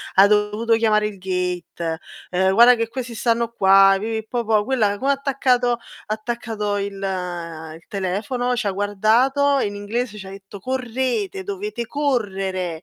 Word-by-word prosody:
Ha 195 - +8
dovuto 210 +2 +1
chiamare 215 -2 +2
il 200 -2 -9
gate, 180 -3 -3 0.3
ehm: 190 +1 +2
"Guarda 240 +3 +8
che 230 -1 -1
questi 245 0 -6
stanno 230 +1 0
qua", 195 -1 +6
pipì, 220 +1 -3
popò. 220 -3 +1
Quella 220 -6 +1
come 270 +6 +1
ha - - +4
attaccato 260 -3 +1
ha 235 - -4 0.3
attaccato 215 -1 -3
il 200 0 -3
il 170 -4 -5
telefono, 220 +7 -2
c'ha 215 -5 -1
guardato, 230 +8 +2
in 205 -3 -2
inglese 210 +2 -3
c'ha 190 -1 -9
detto: 195 0 -11
"Correte, 260 - -2
dovete 400 - -4
correre". 195 - -2
215 Hz, 145 wpm, -21 LUFS, 195-245 Hz, 0.3 s, Ha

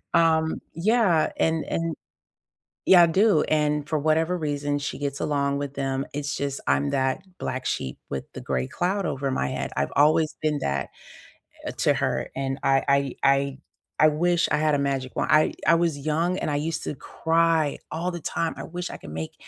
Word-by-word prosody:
Um, 160 -1 +3 0.2
yeah, 185 -3 +2
and 160 -1 +1
and 165 0 -2 0.9
yeah, 180 -2 +8
I - - +5
do, 190 0 +3
and 150 -1 0
for 155 - 0
whatever 160 +4 +1
reason, 145 -3 -1
she 145 - -4
gets 140 -1 -3
along 140 -1 0
with 140 -1 -4
them. 135 -1 -2
It's 145 0 -3
just 140 -1 -3
I'm 70 +1 +2
that 130 - 0 0.2
black 130 0 -4
sheep 65 - -2
with 70 - -3
the - - -6
gray 65 -1 -2
cloud 190 +2 -1
over 135 0 -2
my 130 - 0
head. - - -3
I've 70 - -1
always 155 +2 +4
been 155 -1 +1
that, 70 0 -1 0.8
eh, - - -2
to - - +3
her, - - -1
and 135 0 -2
I 135 0 +3
I 140 -1 +2
I 140 0 +2 0.4
I 155 - +7
wish 175 +3 +1
I 150 - +3
had 155 0 +2
a - - 0
magic 135 -2 -2
wand. - - -1
I 155 0 +4
I 165 - +7
was 165 -3 0
young, 160 +5 0
and - - -2
I - - 0
used 160 +2 -2
to - - -3
cry 165 0 +1
all 170 +3 -2
the 175 - -5
time, 165 +2 -2
"I - - -6
wish 180 +1 -5
I - - -7
could - - -11
make 80 +1 -5
150 Hz, 195 wpm, -25 LUFS, 140-165 Hz, 0.9 s, yeah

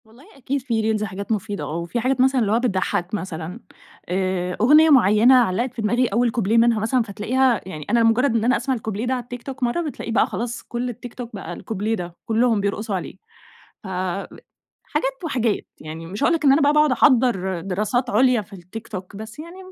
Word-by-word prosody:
والله 230 +5 -19
أكيد 275 +1 -3
في 220 -3 0
reels 210 - -3
حاجات 200 +1 -5
مفيدة 205 -1 -2
آه، 155 - -4
وفي 170 +7 -3
حاجات 255 +2 +1
مثلًا 260 0 +3
اللي 205 -2 +1
هو 225 - +3
بتضحك 195 -5 -1
مثلًا 180 -1 -5 0.5
آآ، 185 -1 -1
أغنية 305 +7 +6
معينة 240 -1 +6
علقت 240 +1 +2
في 235 - -5
دماغي 240 +4 +2
أول 235 +3 +1
كوبليه 225 -1 +1
منها 230 -1 +4
مثلًا 230 +4 +1
فتلاقيها 230 +3 +1
يعني 155 -6 -7
أنا 235 -1 +3
مجرد 230 +2 +3
إن 225 - +1
أنا 250 +3 +3
أسمع 265 -1 -1
الكوبليه 220 -1 -4
ده 255 - 0
على 250 -1 -2
التيك 245 0 -9
توك 270 -1 -6
مرة 245 +8 +1
بتلاقيه 295 -7 -5
بَقى 225 - +3
خلاص 235 +1 -4
كل 245 +1 -4
التيك 240 0 -8
توك 235 -3 -8
بَقى 195 - -6
الكوبليه 220 +1 -3
ده، 175 -3 -7
كلهم 225 -1 +2
بيرقصوا 200 +1 -2
عليه 180 - -5 0.7
ف - - -8 1.0
حاجات - - -3
وحاجات، 240 - -1 0.2
يعني 160 +2 -8
مش 195 +4 -4
هاقول 335 - +4
لك 310 - -2
إن 275 - +7
أنا 280 +3 +4
بَقى 285 +1 +4
باقعد 300 -1 +4
أحضّر 235 - +2
دراسات 210 +7 -1
عليا 245 +1 +3
في 200 - -15
التيك 190 +5 -9
توك، 185 -1 -8
بس 220 +6 -9
يعني 335 +4 -9
225 Hz, 205 wpm, -22 LUFS, 200-255 Hz, 1.0 s, إن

